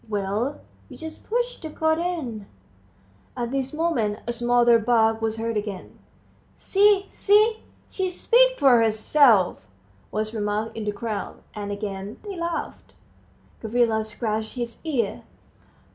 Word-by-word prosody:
"Well, 210 +6 -2 0.3
you - - -11
just 320 -1 -10
push 485 +2 -1
the 320 - -7
coat 315 +1 +1
in." 275 - -3 0.9
At 240 -1 -2
this 270 -1 -2
moment 300 -11 -1
a 240 - -2
smothered 240 -1 +3
bark 225 -1 +3
was 225 0 -1
heard 230 0 -2
again. 205 -3 -5 0.6
"See, 400 0 +3
see 430 +2 +3 0.3
she 380 -1 -1
speaks - - +3
for 265 -5 +6
herself," 220 -1 +3 0.5
was 215 +1 -3
remarked 210 0 -2
in 220 - -4
the 210 - 0
crowd, 210 0 -5
and 205 -1 -5
again 200 0 -5
they 405 -2 -6
laughed. 340 -1 -5 0.7
Gavrila 225 -1 +1
scratched 220 0 -3
his 240 -2 -5
ear. 260 -10 -1
235 Hz, 130 wpm, -24 LUFS, 215-320 Hz, 0.9 s, for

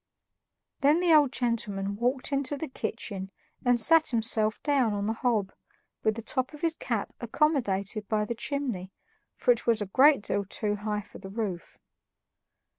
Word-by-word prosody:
Then 295 +4 +4
the 350 -2 +4
old 295 -4 +5
gentleman 205 -6 -2
walked 250 +6 -1
into 280 +1 0
the 320 - -4
kitchen 195 -7 -5 0.3
and 245 -1 +3
sat 320 +6 +5
himself 220 -2 +2
down 270 -7 +2
on 200 0 -2
the 220 - 0
hob, 225 -5 0 0.5
with 215 -1 +1
the 230 - -6
top 260 +5 -2
of 300 - -14
his 330 -1 +1
cap 230 -9 -3
accommodated 220 -6 0
up 210 -1 +1
the 235 - -2
chimney, 235 -7 -3 0.4
for - - +3
it 480 - +1
was 230 -2 +3
a 205 - -2
great 265 +4 +5
deal 200 - -1
too 205 +1 -2
high 210 0 -2
for 205 - -14
the 190 - -9
roof. 195 -5 -5
230 Hz, 170 wpm, -28 LUFS, 205-275 Hz, 0.5 s, old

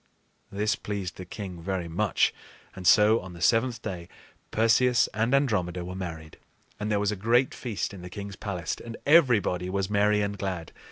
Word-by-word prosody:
This 105 +3 0
pleased 100 -4 -5
the 95 - -7
king 90 -2 -7
very 90 -1 -3
much; 95 +5 +1 0.4
and 90 -2 -4
so, 110 +4 +6
on 90 -1 -9
the 85 - -11
seventh 115 +4 +2
day, 85 -2 -5 0.4
Perseus 120 +2 +3
and 115 +3 0
Andromeda 95 -11 +1
were 90 - -6
married, 80 -4 -7 0.4
and 105 - -2
there 105 - +2
was 105 0 +1
a - - -2
great 115 +6 +2
feast 115 -5 -4
in 95 - -9
the 90 - -8
king's 100 +1 -7
palace, 90 -6 -4
and 115 -1 -7
everybody 115 - +4
was 95 +1 -2
merry 105 0 +3
and 100 -1 -3
glad. 90 -5 -4
100 Hz, 180 wpm, -27 LUFS, 90-110 Hz, 0.4 s, so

